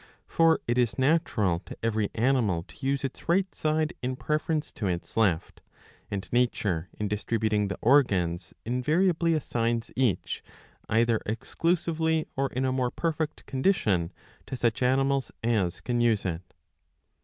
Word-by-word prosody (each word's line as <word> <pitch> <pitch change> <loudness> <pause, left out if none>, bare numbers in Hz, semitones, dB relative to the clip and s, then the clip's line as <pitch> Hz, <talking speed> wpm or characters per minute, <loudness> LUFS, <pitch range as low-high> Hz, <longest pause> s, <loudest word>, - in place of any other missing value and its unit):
''^ - - -23 0.2
For 165 -1 +3
it 120 +1 +1
is 120 -2 +2
natural^ 130 - +1
to - - -9
every 110 -2 +1
animal 115 -8 +2
to 140 - -18
use 140 0 0
its 135 +4 -6
right 190 +2 +2
side 155 +1 0
in 130 +1 -2
preference 155 +2 -1
to 105 - -3
its 90 -2 -3
left; 100 -8 +1 0.5
and 100 -1 -4
nature, 100 -8 +1
in 105 - -1
dis 105 +1 -3
tributing 110 -3 +1
the 100 - -4
organs, 95 -10 +3
invariably 160 - +2
assigns 115 -5 -1
each, 120 -9 0 0.5
either 115 0 +2
exclusively 160 - 0
or 135 +1 +1
in 130 +1 -1
a 130 - +1
more 130 -1 0
perfect 160 +1 -2
condition, 115 - +1 0.4
to - - -4
such 120 -2 0
animals 135 +1 +2
as 105 -7 0
can 120 -1 0
use 115 -4 +2
it. 90 0 -5
125 Hz, 150 wpm, -27 LUFS, 105-150 Hz, 0.5 s, For